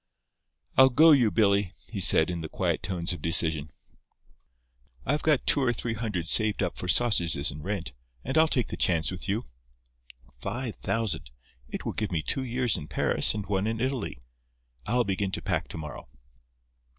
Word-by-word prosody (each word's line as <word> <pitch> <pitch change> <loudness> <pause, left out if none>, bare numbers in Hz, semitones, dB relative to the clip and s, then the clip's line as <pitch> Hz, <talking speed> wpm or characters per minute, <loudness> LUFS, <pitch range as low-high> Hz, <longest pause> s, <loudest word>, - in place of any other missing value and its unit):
"I'll 130 0 +8
go 155 +6 +6
you, 125 -7 +5
Billy," 100 -1 +2 0.2
he 100 -4 -4
said, 85 -1 +5
in 85 -1 -4
the 80 - -6
quiet - - -1
tones 90 -2 -2
of 85 - -8
decision. 80 -3 +1 1.4
"I've 150 +4 0
got 155 -4 +2
two 145 - +3
or 125 -2 +2
three 115 0 -3
hundred 105 -7 -3
saved 110 +2 +2
up 90 - -2
for 90 - -6
sausages 85 -9 +3
and 75 +2 -9
rent; - - -4 0.3
and 130 - -3
I'll 160 0 +5
take 125 -6 0
the - - -5
chance 85 -2 +2
with 95 +2 -5
you. 105 +4 -1 0.9
Five 120 - -4
thousand! 110 - -1 0.4
It - - -6
will - - -2
give 105 -3 -3
me 80 -3 -1
two 135 - -1
years 125 -3 0
in 75 -3 -7
Paris - - +1
and 105 -2 -4
one 100 0 -1
in 110 0 -2
Italy. 120 - -2 0.7
I'll 120 +3 +2
begin 100 -1 -1
to - - -3
pack - - -1
to - - -7
morrow." 75 -5 -8
105 Hz, 180 wpm, -27 LUFS, 85-120 Hz, 1.4 s, I'll